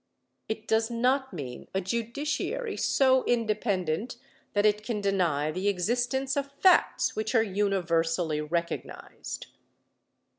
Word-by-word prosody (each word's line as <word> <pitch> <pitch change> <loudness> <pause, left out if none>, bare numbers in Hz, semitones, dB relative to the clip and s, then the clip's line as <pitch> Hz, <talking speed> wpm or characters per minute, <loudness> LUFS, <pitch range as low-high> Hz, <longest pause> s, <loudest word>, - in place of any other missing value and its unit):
It 220 0 -4
does 225 +1 +2
not 255 +3 +1
mean 135 -9 -7
a - - +3
judiciary 280 - -2
so 260 -1 +3
independent 215 -3 0 0.4
that 205 0 +2
it 210 0 +3
can 220 -2 -2
deny 175 -7 +1
the 185 +5 -2
existence 245 +8 0
of 280 0 -2
facts 365 +6 +3
which 215 +2 -2
are 225 - +5
universally 170 -6 0
recognized. 170 +3 -4
215 Hz, 115 wpm, -28 LUFS, 180-245 Hz, 0.4 s, are